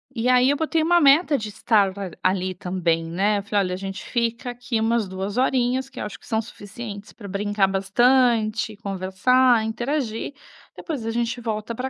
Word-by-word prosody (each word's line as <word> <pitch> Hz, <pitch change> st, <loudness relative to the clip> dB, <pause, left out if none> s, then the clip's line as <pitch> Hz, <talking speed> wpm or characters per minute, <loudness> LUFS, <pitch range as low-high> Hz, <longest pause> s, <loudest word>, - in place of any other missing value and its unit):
E 235 Hz, +1 st, 0 dB
aí, 255 Hz, +1 st, +5 dB
eu 290 Hz, -, 0 dB
botei 320 Hz, +1 st, 0 dB
uma 345 Hz, +1 st, +4 dB
meta 290 Hz, +1 st, +5 dB
de 215 Hz, -1 st, -5 dB
estar 205 Hz, -2 st, +2 dB
a 190 Hz, -3 st, -5 dB, 0.2 s
ali 185 Hz, 0 st, -2 dB
também, 175 Hz, -2 st, -1 dB
né. 200 Hz, +5 st, +1 dB
Eu 200 Hz, -, -7 dB
falei: 205 Hz, 0 st, 0 dB
"Alha, 180 Hz, -1 st, -2 dB
a -, -, -3 dB
gente 195 Hz, 0 st, -6 dB
fica 235 Hz, 0 st, -2 dB
aqui 245 Hz, -1 st, -3 dB
umas 225 Hz, -1 st, +1 dB
2 190 Hz, +4 st, -5 dB
horinhas 260 Hz, 0 st, +1 dB
que 270 Hz, -, -10 dB
eu -, -, -3 dB
acho 210 Hz, -, -8 dB
que -, -, -18 dB
são 220 Hz, -1 st, 0 dB
suficientes 205 Hz, -1 st, -9 dB
pra 205 Hz, -, -10 dB
brincar 200 Hz, 0 st, 0 dB
bastante, 220 Hz, +2 st, +2 dB
conversar, 205 Hz, +6 st, +2 dB
interagir, 240 Hz, +2 st, -3 dB, 0.4 s
depois 285 Hz, -9 st, -5 dB
a 225 Hz, -, -1 dB
gente 235 Hz, +1 st, -2 dB
volta 220 Hz, 0 st, -3 dB
pra 255 Hz, +3 st, -4 dB
225 Hz, 190 wpm, -23 LUFS, 200-250 Hz, 0.4 s, aí